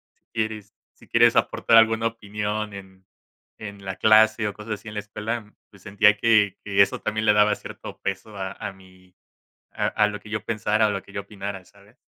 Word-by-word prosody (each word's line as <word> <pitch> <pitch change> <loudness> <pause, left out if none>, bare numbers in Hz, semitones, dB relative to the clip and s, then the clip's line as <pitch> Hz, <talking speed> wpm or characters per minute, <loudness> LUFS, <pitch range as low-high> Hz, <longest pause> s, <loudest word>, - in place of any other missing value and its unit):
si - - -45
quieres 110 -2 -3 0.2
si - - -20
quieres - - +4
aportar 115 - +3
alguna 115 0 +4
opinión 105 -1 -4
en 95 -1 -12 0.5
en 100 -2 -9
la 95 -1 -4
clase 110 +1 +4
o 105 - -4
cosas 105 +1 -6
así 110 - -15
en 105 - -7
la 105 - -3
escuela, 105 +1 -5 0.2
pues 100 -3 -19
sentía 105 +1 +4
que 105 -2 +3
que 100 -1 +2
eso 100 - -3
también 110 0 -2
le 105 - +5
daba 105 0 +4
cierto - - -10
peso 100 +2 -4
a 95 -1 -4
a 105 - -6
mi 95 -1 -20 0.6
a - - -1
a 105 - +2
lo 105 0 -5
que 105 - -14
yo 105 -1 -3
pensara 110 -1 +1
o - - 0
lo 100 -1 -3
que 95 - -17
yo 100 - -3
opinara, 100 -1 -7
¿sabes? 100 +4 -22
105 Hz, 210 wpm, -24 LUFS, 100-110 Hz, 0.6 s, le